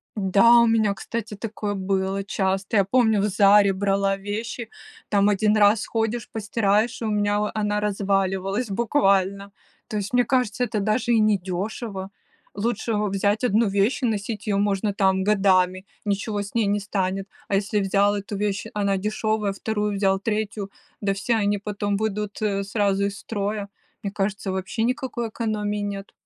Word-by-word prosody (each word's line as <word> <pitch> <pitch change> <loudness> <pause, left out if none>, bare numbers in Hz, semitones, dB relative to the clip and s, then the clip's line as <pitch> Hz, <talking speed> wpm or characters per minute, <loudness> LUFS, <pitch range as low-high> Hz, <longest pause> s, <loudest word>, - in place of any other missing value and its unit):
Да, 210 +4 +5
у - - +5
меня, 220 -3 +3
кстати, 220 +1 -5
такое 210 -1 -4
было 195 0 -1
часто. 195 +1 -1
Я 200 - +5
помню 220 -1 +3
в - - +1
"Заре" 200 0 +5
брала 195 0 +1
вещи, 220 +3 -5 0.4
там 200 -1 +3
1 210 +1 +2
раз 205 +1 +4
ходишь, 225 0 -2
постираешь, 215 +2 0
и 230 - -2
у 215 - -1
меня 205 0 +1
во 210 0 -1
она 210 -1 0
разваливалась 195 +1 0
буквально. 200 -3 +1 0.4
То 215 - -3
есть, 205 +3 -4
мне 245 0 +4
кажется, 250 -3 +1
это 225 -3 -1
даже 215 +4 0
и 225 - +4
недешево. 195 0 -1 0.5
Лучше 220 +1 -1
взять 205 +1 0
1 230 -1 +3
вещь 200 +7 +1
и 250 - +2
носить 215 0 -3
ее 205 - +1
можно, 205 +1 +1
там, 190 -1 +2
годами, 190 -2 +2 0.2
ничего 205 +1 -1
с 200 +2 -8
ней 230 -2 +2
не 205 +1 +1
станет. 195 -1 -2 0.2
А - - -4
если 205 +1 0
взял 200 +1 +2
эту 205 0 -5
вещь, 200 0 -2
она 200 -2 0
дешевая, 215 0 -1
2 210 +1 -2
взял, 195 -1 +2
3- 210 -1 -3 0.3
да 200 -1 +1
все 210 +4 0
они 205 -1 +1
потом 205 0 -2
выйдут 210 -1 -3 0.2
сразу 200 -1 0
из 200 0 -4
строя. 205 -1 -3 0.3
Мне 200 - -4
кажется, 195 -1 -2
вообще 190 +4 -3
никакой 250 -2 -2
экономии 210 -2 -2
нет. 200 -1 -5
205 Hz, 165 wpm, -24 LUFS, 195-215 Hz, 0.5 s, Да